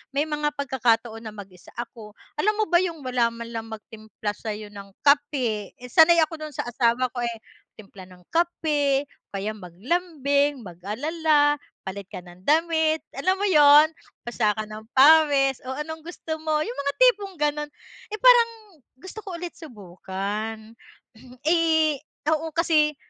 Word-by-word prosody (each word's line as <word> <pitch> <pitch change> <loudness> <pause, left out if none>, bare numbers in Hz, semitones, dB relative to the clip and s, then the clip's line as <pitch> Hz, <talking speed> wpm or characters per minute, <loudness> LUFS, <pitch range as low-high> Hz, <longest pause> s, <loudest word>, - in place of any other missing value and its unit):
may 285 - +2
mga 300 -1 -1
pagkakataon 235 -4 0
na 215 - -8
mag-isa 190 -3 -13
ako, 225 -3 -8 0.3
alam 425 +6 +2
mo 435 - +2
ba 345 - +6
yung 335 -4 -4
wala 250 -2 +2
man 230 0 -8
lang 225 -1 -5
magtimpla 215 -1 -7
sayo 215 -1 -6
ng 200 -1 -11
kape, 275 -8 +1
eh 250 0 -11
sanay 335 +1 +6
ako 315 -1 -5
dun 300 - -12
sa - - -2
asawa 240 +1 +1
ko 245 - -5
eh, 235 -1 -3 0.4
timpla 195 -3 -13
ng 180 -1 -17
kape 300 -5 +1
o - - -32
kaya 200 +2 -2
maglambing, 280 - -1
mag-alala, 290 - 0 0.3
palit 190 0 -6
ka - - -7
ng 175 +1 -16
damit, 320 0 +2
alam 370 +8 +1
mo 400 - -3
yun. 295 -3 +7 0.4
Basa 220 -3 0
ka 215 - -2
ng 215 +1 -10
pawis, 280 -2 +5
"o 260 - -3
anong 320 +1 -5
gusto 325 -1 -6
mo?" 310 -1 0
yung 250 0 -6
mga 280 0 -1
tipong 415 -6 +3
ganon. 295 0 0 0.4
Eh - - -2
parang 485 -2 +6 0.5
gusto 375 +8 -10
ko 380 -4 -7
ulit 350 0 -6
subukan. 210 - -6 0.8
Eh 320 -3 +3 0.3
oo, 315 +1 0
kasi 305 -3 +2
280 Hz, 155 wpm, -24 LUFS, 220-315 Hz, 0.8 s, yun